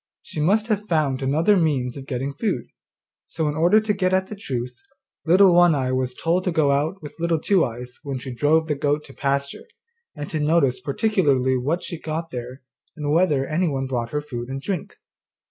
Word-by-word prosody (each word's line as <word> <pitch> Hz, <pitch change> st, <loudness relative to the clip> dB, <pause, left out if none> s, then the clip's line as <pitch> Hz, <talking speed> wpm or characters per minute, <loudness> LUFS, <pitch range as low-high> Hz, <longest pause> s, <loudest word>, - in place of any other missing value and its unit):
She -, -, -6 dB
must 200 Hz, +8 st, +2 dB
have 210 Hz, -2 st, -1 dB
found 150 Hz, -7 st, +1 dB
other 155 Hz, +9 st, +3 dB
means 140 Hz, -8 st, 0 dB
of 135 Hz, -1 st, -9 dB
getting 135 Hz, +1 st, -3 dB
food.' 160 Hz, -, -2 dB, 0.6 s
So 160 Hz, -2 st, -2 dB
in 150 Hz, -, 0 dB
order 175 Hz, +7 st, +5 dB
to 215 Hz, -1 st, 0 dB
get 185 Hz, -2 st, 0 dB
at 190 Hz, 0 st, 0 dB
the 210 Hz, -, -6 dB
truth, 125 Hz, -, -4 dB, 0.5 s
Little 185 Hz, +2 st, +6 dB
One 175 Hz, -2 st, +6 dB
eye 130 Hz, -2 st, -1 dB
was 130 Hz, -1 st, -1 dB
told 175 Hz, +3 st, 0 dB
to 180 Hz, -, +1 dB
go 155 Hz, -4 st, +2 dB
out 155 Hz, +6 st, -1 dB
with 150 Hz, -, -9 dB
Little 170 Hz, 0 st, +1 dB
Two 190 Hz, +2 st, +3 dB
eyes 125 Hz, +1 st, -6 dB
when 140 Hz, -3 st, -4 dB
she 130 Hz, 0 st, -7 dB
drove 155 Hz, +5 st, +2 dB
the 150 Hz, -, +1 dB
goat 145 Hz, +1 st, -1 dB
to 135 Hz, -, -13 dB
pasture, 140 Hz, 0 st, -2 dB, 0.5 s
and 145 Hz, 0 st, -5 dB
to 155 Hz, -, -1 dB
notice 150 Hz, -4 st, +2 dB
particularly 140 Hz, -, +1 dB
what 150 Hz, +8 st, -1 dB
she 170 Hz, -, -5 dB
got 165 Hz, +1 st, -4 dB
there, 125 Hz, +1 st, -7 dB, 0.3 s
and 145 Hz, -1 st, -2 dB
whether 155 Hz, -5 st, +2 dB
anyone 155 Hz, -4 st, -1 dB
brought 120 Hz, -3 st, -2 dB
her 150 Hz, +4 st, -2 dB
food 125 Hz, -4 st, -6 dB
and 135 Hz, +1 st, -4 dB
drink. 180 Hz, +4 st, -4 dB
150 Hz, 200 wpm, -23 LUFS, 135-170 Hz, 0.6 s, Little